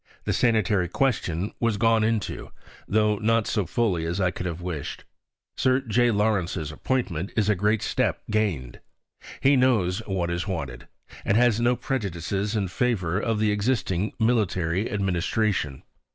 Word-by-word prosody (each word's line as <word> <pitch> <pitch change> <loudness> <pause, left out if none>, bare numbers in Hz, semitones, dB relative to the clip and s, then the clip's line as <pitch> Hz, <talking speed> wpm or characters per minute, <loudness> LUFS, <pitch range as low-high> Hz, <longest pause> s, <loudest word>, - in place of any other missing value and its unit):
The - - -1
sanitary 105 -6 +2
question 100 -6 0
was 115 -3 +1
gone 115 0 +3
into, 110 -3 -1 0.4
tho' 105 0 +2
not 115 0 +2
so 105 -4 -1
fully 100 -9 0
as 85 +4 -2
I 95 -2 +2
could 90 - -5
have 85 -1 -4
wished. 85 -5 -5 0.5
Sir 130 0 +2
J. 120 -1 +2
Lawrence's 100 -7 0
appointment 95 -2 -2
is 105 -1 +2
a 105 - +3
great 105 +3 +1
step - - 0
gained. 90 - -1 0.6
He 140 +1 +5
knows 115 -8 +2
what 90 -3 -1
is 85 +4 -2
wanted, 70 -10 -5 0.4
and 100 - +2
has 120 -2 +3
no 120 +1 +3
prejudices 100 -4 -2
in 100 -3 0
favour 95 -3 0
of 115 0 0
the 105 0 +2
existing 105 -3 0
military 100 -5 +1
administration. 95 -5 -1
105 Hz, 150 wpm, -25 LUFS, 90-115 Hz, 0.6 s, He